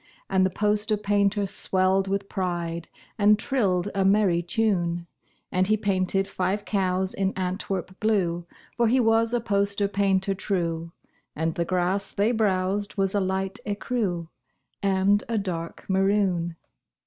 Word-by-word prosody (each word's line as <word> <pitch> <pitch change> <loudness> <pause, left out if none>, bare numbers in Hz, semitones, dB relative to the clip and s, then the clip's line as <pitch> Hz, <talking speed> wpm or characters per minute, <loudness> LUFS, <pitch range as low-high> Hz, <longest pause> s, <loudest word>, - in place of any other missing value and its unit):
And 190 -1 +4
the 185 - +3
poster 210 +2 0
painter 205 0 +1
swelled 190 0 +1
with 195 0 -1
pride 170 -3 -3 0.3
And 210 +1 +6
trilled 205 -6 0
a 195 -1 +1
merry 195 -3 +3
tune. 175 -3 0 0.5
And 185 +1 +2
he 215 +1 +3
painted 195 -1 0
five 195 +1 -2
cows 190 -2 0
in 195 0 0
Antwerp 185 0 -3
blue 175 -6 0 0.3
(For 235 -1 +3
he 255 +4 +3
was 225 -1 +3
a 240 - +1
poster 200 -2 0
painter 195 -1 +1
true), 170 -4 -2 0.4
And 160 +1 -1
the 170 - -1
grass 185 +2 -1
they 205 +4 +2
browsed 205 -2 0
was 195 -1 +1
a 205 - +2
light 190 0 -2
écru 205 -5 -2 0.5
And 195 +1 +3
a 230 - 0
dark 170 -5 -4
maroon. 190 -3 +1
195 Hz, 140 wpm, -26 LUFS, 185-205 Hz, 0.5 s, And